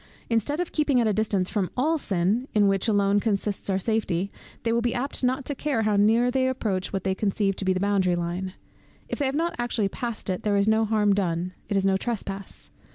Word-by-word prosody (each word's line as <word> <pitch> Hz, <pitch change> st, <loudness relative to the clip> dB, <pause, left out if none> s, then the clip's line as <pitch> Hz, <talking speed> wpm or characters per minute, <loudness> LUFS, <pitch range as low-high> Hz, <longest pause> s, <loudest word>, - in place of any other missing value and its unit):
Instead 230 Hz, +7 st, +1 dB
of 355 Hz, -, -2 dB
keeping 295 Hz, -4 st, +2 dB
at 235 Hz, -, +2 dB
a 215 Hz, -, +2 dB
distance 200 Hz, -3 st, +1 dB
from 195 Hz, -3 st, -1 dB
all 310 Hz, +5 st, +2 dB
sin, 200 Hz, +5 st, 0 dB
in 205 Hz, -1 st, +5 dB
which 195 Hz, +2 st, +2 dB
alone 205 Hz, -1 st, +3 dB
consists 205 Hz, -1 st, -1 dB
our 190 Hz, -, +2 dB
safety, 195 Hz, -3 st, -1 dB, 0.3 s
they 230 Hz, -, +1 dB
will 235 Hz, -, +2 dB
be 240 Hz, 0 st, 0 dB
apt 265 Hz, +2 st, -3 dB
not 255 Hz, +1 st, +1 dB
to 290 Hz, -, -1 dB
care 275 Hz, -4 st, -1 dB
how 210 Hz, -1 st, +2 dB
near 225 Hz, +4 st, +4 dB
they 260 Hz, 0 st, +1 dB
approach 210 Hz, -8 st, -2 dB
what 195 Hz, -, -3 dB
they 190 Hz, -, +1 dB
conceive 195 Hz, 0 st, 0 dB
to 195 Hz, -, -4 dB
be 190 Hz, -, +3 dB
the 185 Hz, -, 0 dB
boundary 195 Hz, -2 st, +2 dB
line; 175 Hz, +2 st, -3 dB, 0.6 s
if -, -, -3 dB
they 280 Hz, -, +1 dB
have 265 Hz, -, -2 dB
not 335 Hz, +3 st, 0 dB
actually 235 Hz, -4 st, 0 dB
passed 235 Hz, +2 st, -5 dB
it, 185 Hz, -2 st, -2 dB
there 205 Hz, -1 st, +1 dB
is 200 Hz, +1 st, +2 dB
no 220 Hz, 0 st, +3 dB
harm 210 Hz, -2 st, +2 dB
done, 180 Hz, -2 st, -1 dB, 0.2 s
it 200 Hz, -, +1 dB
is 195 Hz, -, +1 dB
no 190 Hz, -1 st, +3 dB
trespass. 200 Hz, -3 st, -5 dB
210 Hz, 230 wpm, -25 LUFS, 195-240 Hz, 0.6 s, in